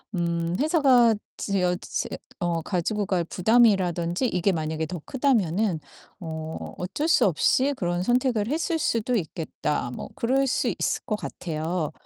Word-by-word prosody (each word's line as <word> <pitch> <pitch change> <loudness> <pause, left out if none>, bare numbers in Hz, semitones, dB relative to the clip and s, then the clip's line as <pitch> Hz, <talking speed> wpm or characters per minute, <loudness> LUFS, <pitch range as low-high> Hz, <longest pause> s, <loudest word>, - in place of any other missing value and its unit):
음 170 0 -1
회사가 270 -7 +5 0.2
지어 180 -3 0
재 - - -3 0.3
어 170 -1 0
가지고 200 +4 -1
갈 175 -3 0
부담이라든지 185 -2 +2
이게 185 -1 +1
만약에 160 -1 -2
더 175 -1 -6
크다면은 210 - +1 0.4
어 160 -1 -6
'어쩔 290 - -2
수 - - +5
없이 260 - +2
그런 175 -3 -1
선택을 240 0 +1
했을 325 +3 -1
수도 235 -4 0
있겠다.' 155 - -3
뭐 - - -6
그럴 270 +3 +1
수 - - +1
있을 - - 0
것 215 - -1
같아요. 160 -3 -3
185 Hz, 280 characters per minute, -25 LUFS, 170-240 Hz, 0.4 s, 회사가